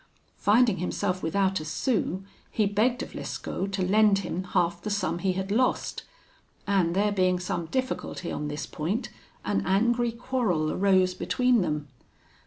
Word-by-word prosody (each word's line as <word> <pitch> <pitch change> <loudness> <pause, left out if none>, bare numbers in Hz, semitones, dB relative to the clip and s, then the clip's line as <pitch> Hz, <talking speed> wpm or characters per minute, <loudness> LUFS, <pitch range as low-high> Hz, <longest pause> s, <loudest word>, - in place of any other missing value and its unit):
Finding 220 -1 +4
himself 180 +1 -2
without 190 +3 +1
a - - -6
sou, 195 +2 -1 0.3
he 215 - +1
begged 220 +5 +1
of - - -9
Lescaut 195 +1 -4
to 190 -2 0
lend 210 +1 +4
him 185 +2 -3
half 175 -2 0
the 210 - -4
sum 205 -4 -1
he 185 +1 +1
had 190 +1 -3
lost; 250 +4 +1 0.6
and 185 -4 +2
there 205 +2 +2
being 185 -2 +2
some 175 -2 -3
difficulty 255 -7 -3
on 150 - -3
this 150 0 -4
point, 185 +11 -3 0.4
an - - +1
angry 235 +5 +2
quarrel 230 -10 0
arose 185 -2 +3
between 250 +4 +2
them. 150 -4 -2
195 Hz, 155 wpm, -27 LUFS, 180-215 Hz, 0.6 s, Finding